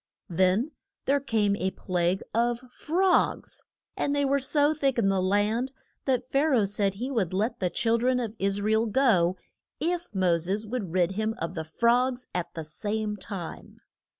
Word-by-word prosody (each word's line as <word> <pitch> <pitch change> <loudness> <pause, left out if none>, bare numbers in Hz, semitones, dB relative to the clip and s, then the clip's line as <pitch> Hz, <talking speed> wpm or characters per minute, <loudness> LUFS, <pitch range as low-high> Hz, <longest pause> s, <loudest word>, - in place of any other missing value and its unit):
Then 190 - +2 0.3
there 280 +1 +3
came 220 -7 +1
a 190 - 0
plague 180 -1 -1
of 235 +1 +1
frogs, 360 +8 +1 0.3
and 285 - 0
they 285 0 +2
were 280 +1 +2
so 290 +3 +2
thick 275 -4 0
in 205 -4 +3
the 195 -1 +2
land 210 +7 +1 0.3
that 255 -2 0
Pha 275 +2 +3
ra 260 -5 +4
oh - - +2
said 200 -1 0
he 250 +7 -4
would 190 -8 0
let 215 +5 0
the 180 - +1
chil 230 +5 +1
dren 250 +1 +2
of 230 -3 -4
Is 200 +1 0
ra 215 - +1
el 220 +1 +2
go 200 -7 +3 0.4
if 350 +3 -1
Mo 185 -4 +2
ses 195 +6 -1
would 215 -6 -4
rid 180 0 +2
him 220 +3 -1
of 165 +1 -4
the 160 -3 -3
frogs 245 +9 +1
at 180 -1 -3
the 165 - -4
same 210 +7 -3
time. 190 -4 -7
215 Hz, 185 wpm, -27 LUFS, 190-255 Hz, 0.4 s, ra